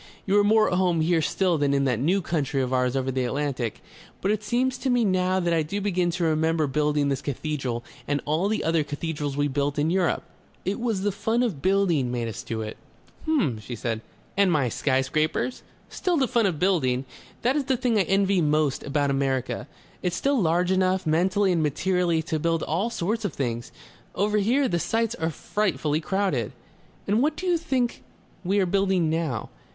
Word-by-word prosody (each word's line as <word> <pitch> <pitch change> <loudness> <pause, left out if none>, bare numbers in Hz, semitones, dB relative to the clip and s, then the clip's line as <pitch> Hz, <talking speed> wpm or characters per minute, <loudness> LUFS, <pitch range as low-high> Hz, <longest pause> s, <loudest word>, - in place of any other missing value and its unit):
"You 195 - +1
are - - +4
more 215 +1 +4
at 180 - +1
home 175 -3 +2
here 165 0 +2
still 175 +1 +1
than 140 -1 +2
in 140 - +2
that 125 -4 +1
new 180 +8 +1
country 145 -5 -1
of 130 0 -2
ours 125 0 +1
over 130 0 0
the 130 0 -1
Atlantic. 130 -2 -2 0.4
But 195 - 0
it 215 -1 0
seems 250 +3 0
to 265 - -1
me 245 -2 +3
now 185 -1 +2
that 175 -2 +1
I 165 - +3
do 160 +7 -3
begin 185 -3 0
to 175 0 -2
remember 160 0 +2
building 150 +1 +1
this 135 -1 -1
cathedral 135 -4 -3 0.2
and 145 0 +1
all 155 +6 +1
the 215 +1 -1
other 165 -1 +2
cathedrals 145 -1 -4
we 145 0 +2
built 140 +1 -1
in 150 +3 +1
Europe.... 185 -2 +1 0.4
It 195 +3 -1
was 225 -5 -1
the 205 - +1
fun 225 +5 0
of 190 - -2
building 175 -8 +2
made 120 -2 -2
us 115 +1 -5
do 115 -2 -4
it..." 110 - -7 0.5
"H'm," 210 - +1
she 120 +3 -7
said. 115 -1 -3 0.3
"And 195 -1 +4
my 140 -6 +2
sky 130 +3 +1
scrapers?" 155 - -1 0.3
"Still 360 -3 -1
the 265 -3 +2
fun 235 -4 +2
of 175 -5 -1
building. 140 -8 +1 0.4
That 250 +3 +2
is 290 -3 0
the 265 -1 +1
thing 235 -3 +1
I - - +5
envy 195 0 +2
most 150 -2 +1
about 145 0 0
America. 135 -2 -1 0.3
It's 180 -1 -1
still 275 -3 +1
large 175 +2 +2
enough, 185 0 +2
mentally 185 +5 +2
and 170 -2 +1
materially, 170 +2 +1
to 160 0 -2
build 165 +1 0
all 185 +9 0
sorts 220 +1 -2
of 200 -7 -2
things.... 120 -3 -3 0.4
Over 210 +2 +1
here, 255 +7 +2
the 175 -5 0
sites 225 +4 0
are 160 -8 -2
frightfully 155 -4 -1
crowded...." 185 - -1 0.5
"And 210 +4 +2
what 300 +2 +1
do 370 - -6
you 350 -2 +2
think 260 -7 -1 0.4
we 195 +3 +1
are 190 - +3
building 190 -2 +2
now? 155 -8 -2
170 Hz, 205 wpm, -25 LUFS, 145-200 Hz, 0.5 s, I